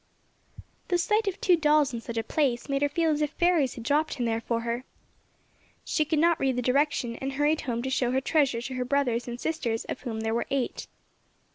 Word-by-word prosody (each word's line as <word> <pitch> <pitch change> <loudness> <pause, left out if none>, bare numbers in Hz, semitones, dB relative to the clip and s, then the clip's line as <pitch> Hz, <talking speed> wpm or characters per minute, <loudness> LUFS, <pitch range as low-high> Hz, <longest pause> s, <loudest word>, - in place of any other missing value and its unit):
The 355 - +2
sight 425 +5 +1
of 390 - -2
two 360 - +4
dolls 300 -4 +3
in 235 - -4
such 230 0 -6
a 225 - 0
place 245 -1 0
made 275 0 -1
her 290 - +2
feel 325 +2 +1
as 300 0 0
if 300 - +1
fairies 345 -7 +2
had 235 - -8
dropped 295 +4 +1
them 245 - -1
there 225 0 0
for 230 0 -1
her. 235 +2 -3 1.0
She 310 - +1
could 310 +1 0
not 335 +2 +3
read 265 -2 +1
the 250 - 0
direction 250 -2 +1
and 270 0 -4
hurried 295 +3 +1
home 235 -2 -3
to 265 - -2
show 250 -2 +1
her 260 +1 +2
treasure 270 -5 +1
to 260 - -5
her 255 0 -1
brothers 250 -3 0
and 240 0 -5
sisters 245 -9 -2
of - - -5
whom 225 -3 -4
there 220 0 -1
were 235 - -1
eight. 270 -3 -2
270 Hz, 230 wpm, -27 LUFS, 240-305 Hz, 1.0 s, two